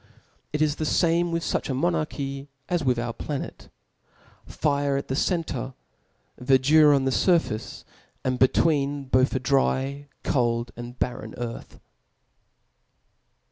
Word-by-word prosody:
It 150 +1 +1
is 150 -1 0
the - - -2
fanrie 170 +2 +2
i^ith - - -9
fuch - - -1
a 130 - -1
monarchy 140 -3 -2 0.2
as 175 -3 0
with 125 -3 +2
our 120 0 -2
planet; 140 +4 -6 0.8
fire 140 -2 0
at 140 - -5
the - - -1
center^* 135 -5 -1 0.6
Verdure 140 +4 +5
on 135 -1 +1
the 135 - +1
furface, 165 - 0 0.4
and 130 -1 -1
between 140 +1 +2
both 130 0 +2
a - - +1
dry^ 135 +1 0 0.2
cold, 120 -2 0
and 120 +1 -8
barren 110 -3 -3
earth. 120 -1 -7
135 Hz, 130 wpm, -25 LUFS, 130-150 Hz, 0.8 s, Verdure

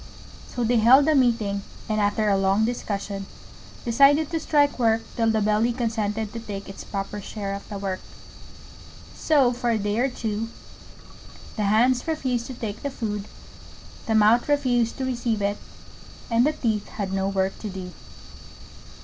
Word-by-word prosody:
So 245 - -3
they 235 +1 +2
held 260 +6 +6
a 315 - +4
meeting, 230 -7 +2 0.3
and 215 -1 0
after 205 +1 +1
a 200 - +4
long 195 +2 +2
discussion, 200 -4 -3 0.6
decided 280 +6 +4
to 325 - 0
strike 290 -3 +2
work 225 -1 +2
till 225 -1 +2
the 220 -1 +1
Belly 215 +3 +2
consented 220 -3 -2
to 230 - -4
take 200 -3 -7
its 195 - -8
proper 200 +1 -5
share 200 -1 -5
of 200 - -8
the 205 - -5
work. 195 -1 -3 1.2
So 275 -6 +3
for 245 0 -2
a 230 - +2
day 205 +1 -1
or 265 +2 +2
two 225 -2 -3 1.1
the 210 - -1
Hands 240 +7 +3
refused 260 -7 -1
to 260 - -7
take 220 -3 -5
the 285 - -2
food, 210 -6 -4 0.8
the 220 - +1
Mouth 220 +5 +4
refused 245 -5 +1
to 265 - -2
receive 240 -4 -1
it, 200 0 0 0.7
and 235 +4 +4
the 305 - +1
Teeth 220 -7 -1
had 195 -3 -4
no 195 0 0
work 190 -1 -1
to 215 - -5
do. 185 -2 -7
225 Hz, 165 wpm, -24 LUFS, 205-245 Hz, 1.2 s, held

